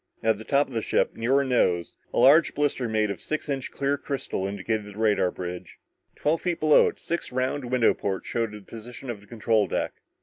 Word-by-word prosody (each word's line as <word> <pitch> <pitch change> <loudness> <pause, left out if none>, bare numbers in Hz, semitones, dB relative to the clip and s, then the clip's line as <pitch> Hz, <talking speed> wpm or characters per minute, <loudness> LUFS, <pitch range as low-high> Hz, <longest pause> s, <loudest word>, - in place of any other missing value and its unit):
At 110 -2 +2
the - - -7
top 140 +4 +2
of 135 - -12
the 115 - -1
ship, - - 0
near 115 +4 +1
her 140 - +4
nose, 90 - +1 0.2
a - - -4
large 140 +7 +6
blister 140 -5 0
made 110 -1 +1
of - - -7
six 155 0 -3
inch 135 -3 -2
clear 140 0 -1
crystal 135 -9 -3
indicated 100 +2 -2
the 105 0 -11
radar 105 -4 +2
bridge. 90 -1 -7 0.4
Twelve 155 +2 0
feet 175 -2 -1
below 155 -1 +6
it, - - -5
six 170 - -4
round 130 +2 -1
window 125 -1 +3
ports 95 -2 -3
showed 115 -2 -1
the 105 0 -9
position 120 +4 -8
of 105 -4 -8
the 100 - -18
control 110 -2 +1
deck. - - -1
115 Hz, 215 wpm, -26 LUFS, 105-140 Hz, 0.4 s, large